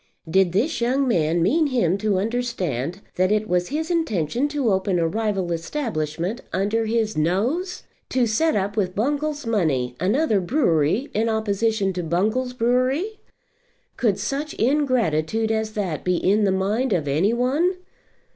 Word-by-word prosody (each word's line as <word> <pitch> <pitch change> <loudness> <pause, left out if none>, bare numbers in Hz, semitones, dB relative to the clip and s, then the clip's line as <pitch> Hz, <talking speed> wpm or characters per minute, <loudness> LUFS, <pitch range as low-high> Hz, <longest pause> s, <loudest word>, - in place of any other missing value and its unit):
Did 185 +2 +3
this 240 - 0
young 260 +3 +1
man 165 -6 +2
mean 305 - +3
him 230 - +1
to 210 -2 +1
understand 190 - -2 0.2
that 185 +2 +2
it 215 0 +1
was 180 -2 +1
his 315 +4 -3
intention 245 - 0
to 285 -6 0
open 190 -1 +1
a 165 -1 +2
rival 195 -2 -1
establishment 170 - -3
under 210 +4 0
his 220 -1 0
nose; 230 - -1 0.3
to 255 -2 +2
set 275 +9 +1
up 200 0 -1
with 185 -4 -1
Bungall's 290 +5 -1
money 150 - 0
another 215 - +2
brewery 190 - +1
in 225 +2 +1
opposition 220 -2 0
to 180 - -3
Bungall's 215 +10 0
brewery? 255 - 0 0.8
Could 210 -6 +1
such 290 +2 -3
ingratitude 225 - +1
as 220 -1 -1
that 185 -8 -3
be 180 0 +1
in 205 +4 +2
the 195 - +2
mind 210 +6 0
of 155 -5 -1
any 160 +10 +2
one? 280 +10 +1
215 Hz, 150 wpm, -23 LUFS, 180-255 Hz, 0.8 s, Did